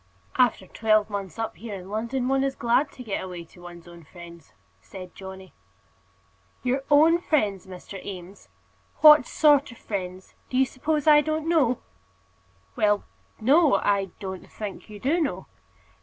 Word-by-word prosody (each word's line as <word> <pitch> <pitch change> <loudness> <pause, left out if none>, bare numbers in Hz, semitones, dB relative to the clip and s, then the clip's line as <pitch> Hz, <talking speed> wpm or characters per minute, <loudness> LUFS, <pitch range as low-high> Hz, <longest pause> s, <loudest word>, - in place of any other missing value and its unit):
"After 245 -6 +2
twelve 215 +1 +1
months 195 -5 -5
up 225 -1 -4
here 220 -2 -7
in 185 -1 -9
London 235 +5 -2
one 270 0 +2
is 270 -1 -1
glad 240 +5 +1
to 250 - -10
get 210 -5 -3
away 180 -2 -7
to 175 +2 -19
one's 175 -1 -12
own 170 -1 -13
friends," 170 +1 -14 0.3
said 185 -2 -11
Johnny. 190 -1 -11 1.1
"Your 260 +2 0
own 315 +4 +5
friends, 205 - 0
Mr. 190 +1 -10
Eames! 185 0 -10 0.5
What 300 -4 +8
sort 290 -3 +3
of 235 - -13
friends? 185 -2 -6 0.2
Do 255 - -2
you 265 - +5
suppose 295 +3 -2
I 300 -1 +7
don't 310 +1 -2
know?" 280 -8 +2 0.9
"Well, 210 -1 +2 0.4
no. 285 +7 +4
I 200 -1 +1
don't 190 -2 -7
think 210 0 -7
you 210 -1 -10
do 290 - +1
know." 295 - -2
215 Hz, 155 wpm, -25 LUFS, 190-270 Hz, 1.1 s, What